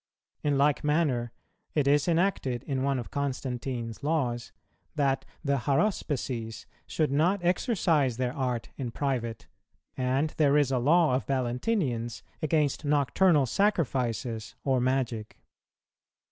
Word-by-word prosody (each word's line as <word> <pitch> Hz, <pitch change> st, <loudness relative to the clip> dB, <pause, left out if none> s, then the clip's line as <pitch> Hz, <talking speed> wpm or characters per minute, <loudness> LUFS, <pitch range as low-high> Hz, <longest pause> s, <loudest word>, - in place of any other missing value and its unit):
[234:5] 150 Hz, -, +1 dB
In 140 Hz, -, +2 dB
like 145 Hz, +1 st, +2 dB
manner, 150 Hz, -6 st, +1 dB, 0.4 s
it 145 Hz, -3 st, +2 dB
is 145 Hz, +2 st, +3 dB
enacted 165 Hz, -8 st, +1 dB
in 135 Hz, -2 st, -2 dB
one 140 Hz, 0 st, +1 dB
of 120 Hz, -, -6 dB
Constantine's 125 Hz, -4 st, -3 dB
Laws 135 Hz, -6 st, -1 dB, 0.4 s
that 140 Hz, -3 st, +1 dB, 0.2 s
the 140 Hz, -2 st, +1 dB
Haruspices 135 Hz, -, -1 dB, 0.2 s
should 155 Hz, -4 st, 0 dB
not 175 Hz, +6 st, +2 dB
exercise 170 Hz, -, +2 dB
their 125 Hz, -1 st, -1 dB
art 125 Hz, -5 st, -2 dB
in 130 Hz, -3 st, -3 dB
private; 120 Hz, -, -2 dB, 0.5 s
and 130 Hz, +4 st, 0 dB
there 145 Hz, -2 st, +4 dB
is 145 Hz, -3 st, +2 dB
a 130 Hz, -, +2 dB
law 155 Hz, +3 st, +4 dB
of 130 Hz, -, -1 dB
Valentinian's 125 Hz, -, -1 dB, 0.2 s
against 150 Hz, -2 st, +1 dB
nocturnal 150 Hz, +2 st, +3 dB
sacrifices 125 Hz, -, -1 dB
or 130 Hz, -2 st, +2 dB
magic. 125 Hz, -4 st, -1 dB
135 Hz, 125 wpm, -28 LUFS, 125-150 Hz, 0.5 s, there